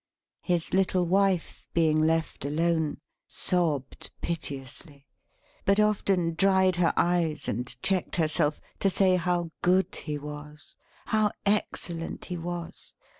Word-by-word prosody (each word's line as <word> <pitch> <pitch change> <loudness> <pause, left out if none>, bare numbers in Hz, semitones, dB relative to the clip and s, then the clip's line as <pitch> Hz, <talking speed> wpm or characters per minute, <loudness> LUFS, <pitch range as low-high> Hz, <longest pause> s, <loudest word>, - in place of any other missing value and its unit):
His 175 -2 -1
little 185 -1 +2
wife, 190 -1 +1
being 155 -2 +3
left 160 -1 0
alone, 160 +1 0 0.3
sobbed 155 -7 0
piteously; 140 -2 -5 0.6
but 200 +1 +3
often 195 -5 +2
dried 190 0 +3
her 175 -1 +3
eyes 170 -3 +1
and 120 +3 -2 0.2
checked 190 -3 0
herself, 155 -2 +1 0.2
to 195 - +3
say 190 -1 +3
how 175 -2 -1
good 185 +2 +2
he 150 -2 -4
was, 150 0 -10 0.3
how 215 -1 +2 0.2
excellent 175 -4 -1
he 180 - -5
was! 170 0 -7
170 Hz, 120 wpm, -27 LUFS, 155-185 Hz, 0.6 s, being